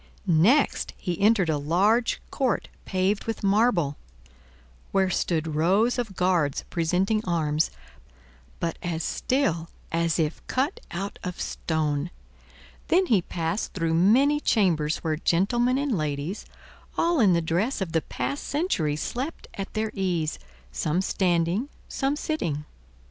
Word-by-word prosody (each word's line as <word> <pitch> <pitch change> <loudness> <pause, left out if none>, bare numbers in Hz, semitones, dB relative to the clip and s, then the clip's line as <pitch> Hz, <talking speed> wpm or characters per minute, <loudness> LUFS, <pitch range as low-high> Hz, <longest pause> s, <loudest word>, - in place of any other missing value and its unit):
Next 200 - +3
he 180 +2 -3
entered 205 -3 +4
a 155 -2 +1
large 200 +11 +2
court 265 -4 0 0.2
paved 190 +2 0
with 225 -2 -4
marble, 195 - +2 0.9
where 190 -1 +2
stood 160 -3 0
rows 195 +11 +2
of 220 -5 -3
guards 175 -6 +1
presenting 185 +6 +1
arms, 160 -4 +1 0.9
but 165 -1 -2
as 165 -2 -2
still 170 - 0 0.2
as 165 0 +1
if 160 -2 -1
cut 275 +7 0
out 195 +3 -5
of 180 -2 -5
stone; 155 -1 -1 0.8
then 370 +3 +4
he 220 - +3
passed 170 +3 -3
through 165 -3 0
many 250 - +4
chambers 165 - +2
where 160 -2 0
gentlemen 240 +10 +2
and 280 -4 0
ladies, 150 +3 -3 0.5
all 340 -2 +2
in 200 -6 +5
the 170 - +3
dress 175 - 0
of 190 -4 -3
the 160 - +2
past 280 - -3
century, 240 - 0
slept 255 - -4
at 195 0 -5
their 215 0 -1
ease, 175 -5 -1 0.3
some 170 +4 0
standing, 180 - +1 0.2
some 275 +1 -1
sitting. 170 - -2
185 Hz, 130 wpm, -26 LUFS, 165-225 Hz, 0.9 s, in